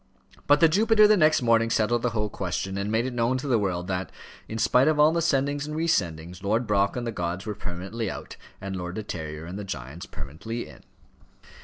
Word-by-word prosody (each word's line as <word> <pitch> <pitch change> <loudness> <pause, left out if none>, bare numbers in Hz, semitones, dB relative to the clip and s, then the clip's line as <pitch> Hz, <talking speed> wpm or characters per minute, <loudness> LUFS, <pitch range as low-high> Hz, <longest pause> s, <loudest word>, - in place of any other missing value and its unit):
But 145 +1 +5
the 165 - +8
Jupiter 215 +5 +5
the 215 - +6
next 155 -7 +4
morning 115 -1 +3
settled 115 +1 +1
the 125 - +1
whole 105 -2 -1
question, 95 +1 -3
and 100 +1 -2
made 115 +2 +1
it 130 - -3
known 120 +2 +1
to 130 - -5
the 120 -4 +3
world 90 -3 -1
that, 95 0 -2 0.4
in 110 - -5
spite 125 +4 +4
of 155 -1 +2
all 150 +1 +6
the 170 - +1
sendings 145 -2 0
and 150 - -5
re 160 +1 0
sendings, 85 - -1
Lord 110 +5 +1
Brock 100 -2 +1
and 125 -1 -3
the 115 - -2
gods 90 -1 -3
were 105 - -3
permanently 95 +3 -5
out, - - -7 0.2
and 95 0 -5
Lord 90 0 -5
De 110 - -4
Terrier 80 -4 -6
and 90 +4 -6
the - - -5
giants 75 -2 -7
permanently 80 - -6
in. - - -14
110 Hz, 225 wpm, -26 LUFS, 90-130 Hz, 0.4 s, the